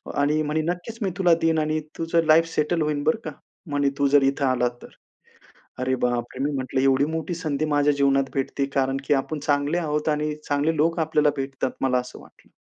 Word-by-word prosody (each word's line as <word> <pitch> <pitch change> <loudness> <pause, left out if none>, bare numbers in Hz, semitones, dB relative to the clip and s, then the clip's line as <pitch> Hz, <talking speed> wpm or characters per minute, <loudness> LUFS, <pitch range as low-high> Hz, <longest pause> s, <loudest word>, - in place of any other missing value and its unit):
आणि 150 +2 +2
म्हणे, 150 +1 -1
"नक्कीच 180 +6 -7
मी 195 - 0
तुला 175 -3 +4
देईन 160 -1 +2
आणि 155 0 0 0.2
तुझं 165 0 +1
लाईफ 160 +1 +6
सेटल 155 +2 +1
होईल, 150 -1 -1
बरं 155 - +1
का, 155 - -4 0.4
म्हणे 145 -1 +2
तू 140 - +3
जर 140 0 +4
इथे 140 - -5
आलात 125 -1 0
तर." - - -11 0.9
अरे 130 0 0
बापरे, 120 +1 -2
मी 150 - 0
म्हंटलं, 130 -1 -2
"एवढी 135 +1 +3
मोठी 160 +2 -3
संधी 155 -3 -2
माझ्या 145 0 +3
जीवनात 135 -1 +2
भेटते, 135 0 -1
कारण 135 0 +1
की - - +4
आपण 145 +2 -1
चांगले 145 +3 0
आहोत 150 -1 -1
आणि 150 0 -1
चांगले 145 +3 +1
लोक 165 +3 +1
आपल्याला 155 -2 +2
भेटतात." 135 -1 -3
मला 130 -1 +2
असं 125 - -8
वाटलं. - - -21
145 Hz, 200 wpm, -24 LUFS, 135-155 Hz, 0.9 s, लाईफ